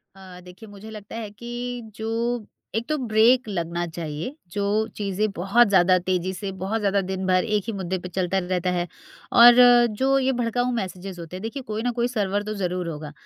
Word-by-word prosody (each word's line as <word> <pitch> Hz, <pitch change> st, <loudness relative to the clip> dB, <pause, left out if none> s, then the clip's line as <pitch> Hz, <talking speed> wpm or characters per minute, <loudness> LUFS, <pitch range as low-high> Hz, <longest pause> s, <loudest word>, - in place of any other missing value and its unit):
अ, 185 Hz, -2 st, -12 dB
देखिए 180 Hz, +4 st, -13 dB
मुझे 205 Hz, +2 st, -11 dB
लगता 210 Hz, 0 st, -9 dB
है 225 Hz, -2 st, -5 dB
कि 240 Hz, +3 st, -6 dB
जो 230 Hz, +1 st, -2 dB, 0.3 s
एक 225 Hz, +1 st, -1 dB
तो 305 Hz, -, +1 dB
ब्रेक 235 Hz, 0 st, +3 dB
लगना 170 Hz, -2 st, -2 dB
चाहिए 160 Hz, -, -5 dB, 0.2 s
जो 200 Hz, +2 st, -2 dB, 0.3 s
चीज़ें 205 Hz, +1 st, -1 dB
बहुत 200 Hz, +7 st, +4 dB
ज़्यादा 185 Hz, -1 st, +5 dB
तेज़ी 185 Hz, 0 st, -1 dB
से 195 Hz, +2 st, -5 dB
बहुत 200 Hz, +4 st, -1 dB
ज़्यादा 200 Hz, -1 st, +1 dB
दिन-भर 185 Hz, -1 st, +1 dB
एक 205 Hz, -, 0 dB
ही 225 Hz, -, -2 dB
मुद्दे 190 Hz, -1 st, -3 dB
पर 180 Hz, -, -8 dB
चलता 185 Hz, +1 st, -1 dB
रहता 180 Hz, 0 st, -1 dB
है 175 Hz, 0 st, -1 dB, 0.5 s
और 240 Hz, 0 st, +10 dB, 0.5 s
जो 270 Hz, +1 st, +4 dB
ये 265 Hz, 0 st, +1 dB
भड़काऊ 245 Hz, +1 st, 0 dB
मैसेजेज़ 185 Hz, -3 st, -5 dB
होते 170 Hz, +2 st, -8 dB
हैं। 185 Hz, -, -7 dB
देखिए 245 Hz, +5 st, -5 dB
कोई 215 Hz, 0 st, -3 dB
ना 245 Hz, -, +1 dB
कोई 240 Hz, +1 st, +2 dB
सर्वर 205 Hz, -4 st, -1 dB
तो 215 Hz, +1 st, -4 dB
ज़रूर 180 Hz, -1 st, -2 dB
होगा 150 Hz, -1 st, -7 dB
200 Hz, 195 wpm, -24 LUFS, 180-230 Hz, 0.5 s, और